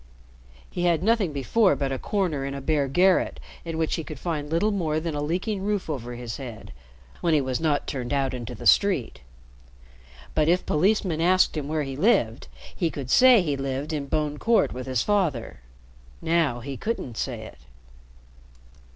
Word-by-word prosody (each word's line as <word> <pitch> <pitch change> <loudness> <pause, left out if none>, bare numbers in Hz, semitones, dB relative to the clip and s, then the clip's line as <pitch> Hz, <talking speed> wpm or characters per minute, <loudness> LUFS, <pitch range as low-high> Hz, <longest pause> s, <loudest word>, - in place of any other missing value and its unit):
He 175 - -3
had 170 -1 +2
nothing 215 -5 +2
before 185 - +2
but 135 -1 -2
a 135 - -2
corner 180 -9 -1
in 140 0 -4
a - - -4
bare 145 0 0
garret 180 +7 +2 0.2
in 165 -1 -5
which 160 -1 0
he 165 - -4
could 155 -1 -8
find 150 -1 -3
little 170 +7 +1
more 160 -6 0
than 160 0 -3
a 145 - -2
leaking 185 +7 -2
roof 200 -4 -1
over 120 -4 -5
his 120 -2 -6
head 120 -5 -9 0.5
when 165 -2 +2
he - - +4
was 130 -2 -2
not 155 -3 0
turned 125 -4 -4
out 135 -2 0
into 120 -1 -6
the - - -10
street. 195 - +3 1.1
But, 155 -1 +2
if 180 +2 +2
policemen 180 0 +1
asked 185 +1 +3
him 150 -2 -3
where 155 0 -1
he 135 -1 -5
lived, 135 - +1 0.3
he 170 - 0
could 135 -4 -6
say 250 -6 +7
he 150 -4 -1
lived 135 +3 -3
in 145 -2 -3
Bone 150 0 -1
Court 230 0 +2
with 130 +1 -6
his 130 -3 0
father. 160 - 0 0.6
Now 160 -7 +1
he 135 +2 -6
couldn't 215 - -4
say - - -3
it. - - -11
155 Hz, 185 wpm, -25 LUFS, 135-180 Hz, 1.1 s, say